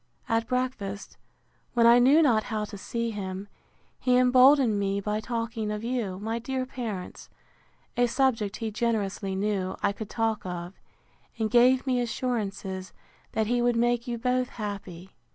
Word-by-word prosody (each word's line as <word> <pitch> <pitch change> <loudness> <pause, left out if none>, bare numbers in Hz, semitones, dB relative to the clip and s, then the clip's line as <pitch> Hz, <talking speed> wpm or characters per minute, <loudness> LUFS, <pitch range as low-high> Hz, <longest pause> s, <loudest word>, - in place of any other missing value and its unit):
At 225 0 0
breakfast, 240 -6 -3 0.6
when 235 -1 +5
I 235 +1 +8
knew 280 +6 +6
not 225 -7 +3
how 215 -2 -2
to 205 - -9
see 230 +3 -3
him, 195 -1 -5 0.5
he 250 -1 +3
emboldened 255 -2 +5
me 200 0 0
by 210 +1 -2
talking 230 -1 -3
of 210 +1 -4
you, 230 -6 -2
my 225 +3 -3
dear 260 +2 -3
parents; 225 -8 -6 0.7
a 245 0 +3
subject, 230 -5 +1
he 225 -2 -3
generously 205 -3 -1
knew, 195 -2 -1
I 200 - +3
could 205 +1 -7
talk 225 -2 -1
of: 175 0 -5 0.6
and 220 -1 -1
gave 250 +2 +5
me 255 -2 +1
assurances, 200 -6 -3 0.4
that 220 - +1
he 240 +2 +1
would 240 0 +2
make 240 +1 +1
you 240 -1 -2
both 250 +1 0
happy. 195 -4 -7
225 Hz, 155 wpm, -27 LUFS, 200-245 Hz, 0.7 s, I